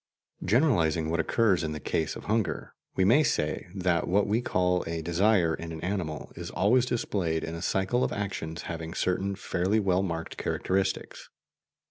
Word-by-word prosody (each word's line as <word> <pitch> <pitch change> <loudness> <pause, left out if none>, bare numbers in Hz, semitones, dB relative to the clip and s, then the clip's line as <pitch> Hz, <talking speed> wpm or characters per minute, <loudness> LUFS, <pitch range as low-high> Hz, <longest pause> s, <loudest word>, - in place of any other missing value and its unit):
Generalizing 85 - +2
what 85 - 0
occurs 100 -2 +2
in 80 -1 -2
the 75 - -5
case 80 0 -1
of - - -8
hunger, 110 0 -1 0.2
we 95 - +3
may 120 +10 +6
say 75 - 0
that 90 -3 +1
what 100 +3 +3
we 110 +4 +1
call 90 -5 +1
a 80 0 -3
desire 85 0 +3
in 85 +1 -5
an 80 - -6
animal 90 -5 -3
is - - -6
always 120 +5 +3
displayed 90 -9 -1
in 80 - -4
a 85 - -5
cycle 95 +7 +1
of - - 0
actions 95 -5 -4
having 80 0 -5
certain 95 +2 0
fairly 95 +2 0
well 95 -2 +2
marked 85 -3 -4
characteristics. 95 0 -2
90 Hz, 170 wpm, -28 LUFS, 80-100 Hz, 0.2 s, may